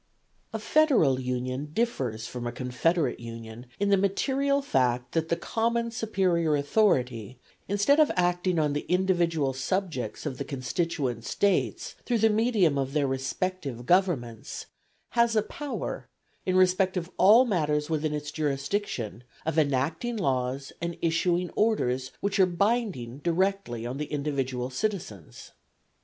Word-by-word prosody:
A - - -2
federal 245 - +3
union 130 +2 -3
differs 130 - -1
from 120 -1 -5
a - - -2
confederate 125 +4 0
union 115 0 -9
in 200 0 +1
the 200 - +5
material 275 +8 +1
fact 125 - +1
that 165 0 -1
the 170 - +2
common 235 +4 -1
superior 185 -8 +1
authority, 130 - +1 0.3
instead 205 +9 +3
of 305 - +5
acting 175 0 +1
on 150 -2 +2
the 145 - -3
individual 170 -6 +1
subjects 150 - -3
of 135 -4 -4
the - - -1
constituent 135 -2 -2
States 200 +10 0
through 240 - 0
the 220 0 +4
medium 210 - +2
of 135 0 -2
their 150 -2 +2
respective 135 0 -3
governments, 140 - 0 0.4
has 235 -1 +2
a 215 - +3
power, 290 +5 -5 0.4
in 185 - +2
respect 185 0 +3
of 180 +1 -4
all 220 +7 +7
matters 150 -8 0
within 155 -1 -1
its 150 0 -5
jurisdiction, 140 - -2 0.2
of 160 0 +1
enacting 155 - 0
laws 135 -5 -1
and 170 0 -3
issuing 170 +1 +1
orders 130 - 0
which 200 0 -1
are 190 - +6
binding 180 - -1
directly 170 - 0
on 125 +3 -4
the 150 - -2
individual 135 -4 -2
citizens. 125 - -4
160 Hz, 140 wpm, -27 LUFS, 130-195 Hz, 0.4 s, all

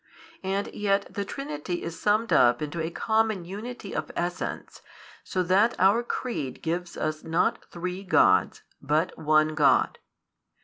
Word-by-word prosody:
And 195 +1 -2
yet 200 -1 0
the 200 - -2
Trinity 175 - -5
is 165 -1 -6
summed 215 +2 +2
up 120 0 +5
into 150 +2 -4
a 160 - -2
common 220 -1 0
Unity 210 +3 -7
of - - -3
Essence, 175 +1 -4 0.4
so 185 - -1
that 195 +6 +3
our 195 +5 +5
|234 240 - -14
Creed 145 - -3
gives 170 +2 -3
us 155 0 -2
not 165 +1 0
three 180 +2 -5
Gods, 95 - +3 0.2
but 150 +5 0
one 155 0 +3
God. 150 -2 +3
180 Hz, 145 wpm, -26 LUFS, 155-205 Hz, 0.4 s, up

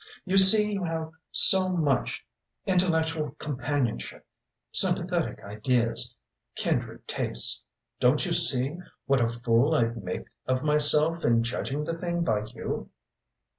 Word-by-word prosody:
You 190 0 -2
see 210 +2 +8
you 195 -2 -3
have 160 -1 -4 0.2
so 190 -1 +5
much 155 -7 -2 0.4
intellectual 160 -5 -1
companionship 130 - -4 0.5
sympathetic - - +1
ideas 115 +3 -2 0.4
kindred - - -3
tastes - - -2 0.4
don't - - +2
you - - -2
see 135 +6 +1 0.3
what 135 -1 +1
a 115 - +2
fool 120 +5 0
I'd 115 -3 -1
make 90 - -6 0.2
of 130 0 -1
myself 150 +2 +2
in 115 0 +2
judging 135 +5 -4
the 165 +1 -5
thing 175 -1 -3
by 105 -9 -1
you?" 110 +2 -7
150 Hz, 125 wpm, -26 LUFS, 120-165 Hz, 0.5 s, see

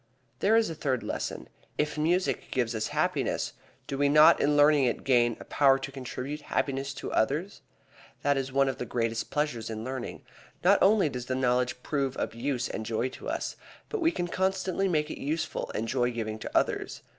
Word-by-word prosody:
There 215 +3 +4
is 225 -1 +4
a 165 - -4
third 135 -5 -1
reason. - - -4 0.3
If 150 0 0
music 170 +5 0
gives 120 -2 0
us 110 -1 -1
happiness, - - -1 0.3
do 135 - -4
we 145 0 +4
not 155 +3 +7
in 145 0 +3
learning 145 -1 +6
it 120 - -1
gain 120 -3 +3
a - - -10
power 135 -2 +4
to 135 0 -6
contribute 135 +2 -5
happiness 140 -1 -2
to - - -6
others? 150 - 0 0.6
That 145 0 +3
is 135 -1 -2
one 135 0 +3
of 135 - -2
the 125 - -4
greatest 115 0 -1
pleasures 145 -7 -1
in 110 0 -5
learning. 130 0 -5 0.4
Not 195 +3 +5
only 200 -3 +5
does 125 -3 -5
the 130 - -1
knowledge 125 -1 0
prove 135 -3 -1
of - - -2
use 125 +1 -2
and 110 - -4
joy 115 +3 -1
to - - -8
us, - - -3 0.3
but 440 - -3
we 330 0 +4
can 175 - -2
constantly 190 +1 0
make 155 -4 0
it - - -7
useful 155 +3 -2
and 115 - -2
joy 125 0 +1
giving 110 -2 -4
to - - -2
others. - - -1
135 Hz, 200 wpm, -28 LUFS, 125-155 Hz, 0.6 s, not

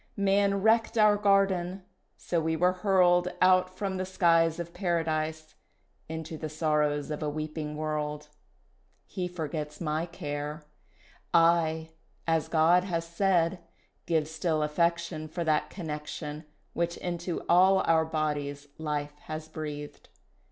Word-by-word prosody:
"Man 200 0 +2
wrecked 225 +1 +3
our 210 -1 +6
garden, 195 -2 +2 0.3
so 170 -2 -1
we 160 0 0
were 180 +3 +3
hurled 180 -2 +3
Out 185 0 +5
from 195 -2 -2
the 185 - -1
skies 165 -3 +3
Of 170 0 -6
Paradise 160 -3 -1 0.6
Into 160 0 -6
the 155 - -4
sorrows 150 -1 0
of 150 - -4
a 150 - -1
weeping 155 0 -4
world. 150 -1 -3 0.8
He 180 -2 -4
forgets 155 -3 -5
my 160 0 -1
care, 150 -2 -5 0.7
I, 160 -1 +3 0.3
as 165 -1 +1
God 165 +2 +4
has 170 -3 -2
said, 175 0 +1 0.5
Give 160 -3 +1
still 160 -1 -1
affection 170 0 0
For 170 +2 -4
that 155 -2 +1
connection 150 -2 -6 0.3
Which 170 0 -1
into 175 -1 -4
all 190 +2 +5
our 160 -1 +4
bodies 145 -2 -3
life 150 -2 -3
has 155 0 -6
breathed. 150 -2 -7
165 Hz, 130 wpm, -29 LUFS, 155-180 Hz, 0.8 s, our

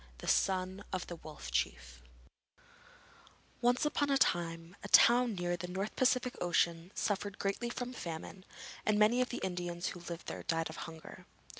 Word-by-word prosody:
THE - - -9
SON 190 +1 +1
OF 185 -1 -2
THE 175 - -7
WOLF 155 -2 -9
CHIEF - - -2 1.6
Once 245 +3 +3
upon 290 -1 +1
a 275 - +4
time 165 -6 0
a - - -4
town 240 -2 +6
near 175 -1 -1
the 175 +1 -5
North 190 +4 -3
Pacific 255 -1 +2
Ocean 170 -1 +1
suffered 205 -1 -1
greatly 200 +4 -1
from 245 +1 -4
famine 170 -1 -6 0.4
and 215 -1 +2
many 215 +4 +5
of 250 - 0
the 240 - -3
Indians 175 -1 -2
who 180 - -7
lived 170 -1 -7
there - - -5
died 165 -1 -1
of 160 - -10
hunger. 160 -1 -12
185 Hz, 165 wpm, -34 LUFS, 170-235 Hz, 1.6 s, town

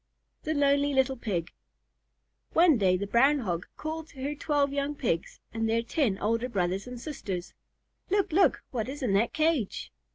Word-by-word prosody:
THE 310 0 -2
LONELY 285 0 +3
LITTLE 265 0 +2
PIG 185 -8 -3 1.0
One 325 -6 +5
day 185 -2 +3
the 200 - -3
Brown 265 +8 +4
Hog 180 -9 -3
called 315 0 -5
to 265 -4 -10
her 285 +2 -1
twelve 285 -1 0
young 285 +1 -1
Pigs 195 - -2
and 225 0 -1
their 230 +1 +1
ten 235 -5 0
older 230 +4 0
brothers 190 -1 -1
and 250 -1 -7
sisters, 200 - -5 0.6
"Look! 400 -1 +1
look! 375 +4 +3
What 235 -1 -2
is 285 +1 -6
in 220 -6 +1
that 215 +4 +2
cage?" 310 -9 0
260 Hz, 170 wpm, -28 LUFS, 210-290 Hz, 1.0 s, One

